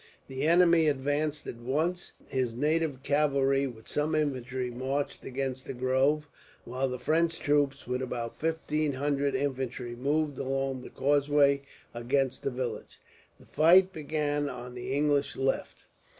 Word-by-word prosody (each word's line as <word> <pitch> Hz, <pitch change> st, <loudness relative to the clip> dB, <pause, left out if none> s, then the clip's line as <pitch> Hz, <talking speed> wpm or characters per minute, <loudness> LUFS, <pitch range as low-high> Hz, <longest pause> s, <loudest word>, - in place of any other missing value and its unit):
The 135 Hz, +3 st, -2 dB
enemy 170 Hz, -1 st, +5 dB
advanced 145 Hz, +2 st, 0 dB
at -, -, -6 dB
once. 155 Hz, +9 st, -2 dB
His 125 Hz, -3 st, -1 dB
native 150 Hz, 0 st, 0 dB
cavalry, 140 Hz, -2 st, +2 dB
with 110 Hz, -3 st, -11 dB
some 150 Hz, +2 st, 0 dB
infantry, 130 Hz, -4 st, -1 dB
marched 135 Hz, +4 st, -3 dB
against 130 Hz, 0 st, -4 dB
the -, -, -5 dB
grove; 130 Hz, +4 st, +1 dB, 0.4 s
while 130 Hz, +2 st, -1 dB
the 125 Hz, -, -3 dB
French 165 Hz, +5 st, +1 dB
troops, 145 Hz, -2 st, +1 dB
with 125 Hz, +1 st, -2 dB
about 120 Hz, -2 st, -4 dB
fifteen 155 Hz, -2 st, -1 dB
hundred 140 Hz, 0 st, 0 dB
infantry, 130 Hz, -3 st, -3 dB
moved 145 Hz, +3 st, 0 dB
along 135 Hz, -1 st, -2 dB
the -, -, -9 dB
causeway 140 Hz, 0 st, +3 dB, 0.3 s
against 130 Hz, +2 st, 0 dB
the -, -, -1 dB
village. 125 Hz, -2 st, -5 dB, 0.4 s
The -, -, -17 dB
fight 180 Hz, +5 st, +5 dB
began 145 Hz, -2 st, -1 dB
on 125 Hz, -1 st, -7 dB
the 125 Hz, +1 st, -6 dB
English 145 Hz, 0 st, +1 dB
left. 135 Hz, 0 st, -2 dB
140 Hz, 140 wpm, -29 LUFS, 130-150 Hz, 0.4 s, enemy